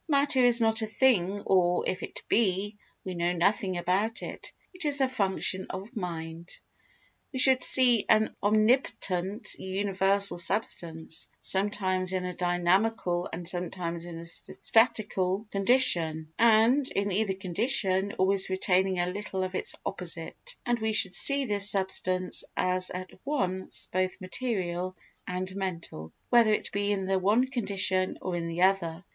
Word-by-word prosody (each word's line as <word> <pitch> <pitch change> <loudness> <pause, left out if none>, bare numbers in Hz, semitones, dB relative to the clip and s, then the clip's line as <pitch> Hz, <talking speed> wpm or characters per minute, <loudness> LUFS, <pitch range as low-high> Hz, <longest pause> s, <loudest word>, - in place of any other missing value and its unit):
Matter 280 -3 +2
is 245 -1 +4
not 220 0 +2
a 220 - -3
thing 205 -4 0
or, 180 -2 +1
if 185 - -3
it - - -7
be, 205 -1 0 0.3
we 185 - -5
know 175 0 -2
nothing 185 +1 -1
about 190 +7 -2
it; - - -9 0.2
it 365 -1 -7
is 290 -2 +3
a 265 - +2
function 190 -5 -1
of 195 +7 -9
mind. 170 -3 -7 0.8
We 265 - -6
should 260 0 +5
see 250 -4 +7
an 220 0 +2
omnipotent, 210 -2 0
universal 195 0 -1
substance, 170 -4 -1
sometimes 190 -2 +1
in 185 -1 -3
a 180 - -5
dynamical 175 +1 -1
and 170 +1 -6
sometimes 175 -1 -3
in 170 -1 -9
a 165 - -9
statical 205 +1 -1
condition 170 -8 +1
and, 235 +4 +3
in 200 +1 -2
either 195 0 -1
condition, 195 0 0
always 190 +1 +1
retaining 190 0 0
a 175 - 0
little 190 +1 -5
of 185 0 -5
its - - +1
opposite; - - -4
and 240 -1 -1
we 220 0 -2
should 190 -3 +1
see 275 +10 +7
this 205 -3 +6
substance 185 -2 +1
as 185 0 +1
at 185 0 -8
once 190 -10 -1
both 185 0 -2
material 185 -4 -4 0.3
and 185 +1 -5
mental, 170 - -7 0.2
whether 235 -3 +4
it 210 - -2
be 205 0 -2
in 195 -2 -2
the 190 0 -1
one 210 +7 +1
condition 195 -7 -1
or 185 - -5
in 170 -1 -4
the 170 +2 -2
other. 180 -3 0
190 Hz, 150 wpm, -27 LUFS, 180-220 Hz, 0.8 s, see